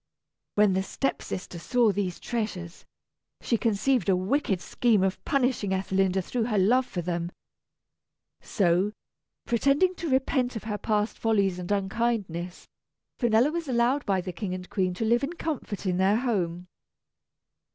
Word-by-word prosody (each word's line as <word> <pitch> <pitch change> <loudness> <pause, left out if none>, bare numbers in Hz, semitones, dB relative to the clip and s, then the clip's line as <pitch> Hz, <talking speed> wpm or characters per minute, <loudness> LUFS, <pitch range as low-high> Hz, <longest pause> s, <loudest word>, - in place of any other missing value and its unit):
_] - - -58 0.5
When 205 -2 +4
the 190 - +1
step 270 +7 -2
sister 180 -1 -6
saw 235 +4 +2
these 190 -3 -2
treasures, 195 -7 -4 0.5
she 235 - 0
conceived 230 -1 +1
a 190 - +5
wicked 195 +1 0
scheme 215 +1 +2
of 190 0 -1
punishing 250 -8 +1
Ethelinda 190 0 +1
through 235 +4 -1
her 220 -3 0
love 245 +7 +3
for 175 -2 -4
them. 170 0 -2 1.1
So, 190 +2 +1 0.5
pretending 280 +10 +3
to 335 - -3
repent 260 -1 +1
of 220 - -5
her 210 -1 -3
past 210 +1 -1
follies 200 -5 +1
and 180 +2 -5
unkindness, 195 -4 -2 0.5
Finella 240 +3 +3
was 335 -1 -3
allowed 250 +3 +2
by 190 -2 +2
the 180 0 -6
King 185 +2 -3
and 180 0 -8
Queen 185 -2 0
to 225 - -2
live 235 +4 +3
in 295 +5 -2
comfort 300 - -4
in 180 -1 +1
their 195 +3 +3
home. 180 -8 -1
205 Hz, 155 wpm, -27 LUFS, 185-240 Hz, 1.1 s, a